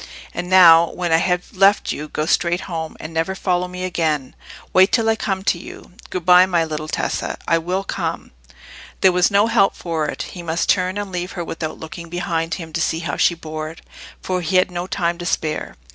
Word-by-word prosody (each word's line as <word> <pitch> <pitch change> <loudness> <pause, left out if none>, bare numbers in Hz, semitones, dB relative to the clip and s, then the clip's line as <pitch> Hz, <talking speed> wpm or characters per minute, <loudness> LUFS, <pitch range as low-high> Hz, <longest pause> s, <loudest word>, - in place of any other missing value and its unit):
And 180 - -4
now, 170 -3 +7
when 175 -2 -3
I 160 - +6
have 180 +2 -1
left 195 +2 +4
you, 150 - -5
go 150 - -3
straight 175 +2 +1
home, 160 -3 -5
and 155 +1 -8
never 165 +4 -1
follow 180 -1 0
me 180 0 -7
again. 155 -7 -1 0.4
Wait 190 +2 +5
till 225 -2 +2
I 225 - +3
come 195 -3 -3
to 175 - +1
you. - - -11 0.2
Good 180 -2 -4
bye, 180 +1 +7
my 170 -3 +1
little 155 -1 -5
Tessa: - - -2
I 165 - +3
will 180 +4 -2
come." - - -4 0.7
There 190 - +6
was 180 0 +3
no 200 +1 +4
help 200 -3 +3
for 160 -3 -2
it; - - -4
he 180 - -7
must 170 0 -2
turn 185 0 +2
and 205 -2 -4
leave 180 0 -4
her 175 - -4
without 160 -1 -5
looking 165 +1 -9
behind 165 -1 -2
him 165 -3 -9
to 170 - -1
see 165 0 0
how 170 - -3
she 170 - +3
bore 155 -1 -6
it, 165 - -12 0.4
for 185 -1 -1
he 180 +2 -2
had 185 0 +4
no 175 +1 -4
time 170 -2 -1
to 175 - -5
spare. 155 -4 -2
175 Hz, 220 wpm, -20 LUFS, 165-185 Hz, 0.7 s, now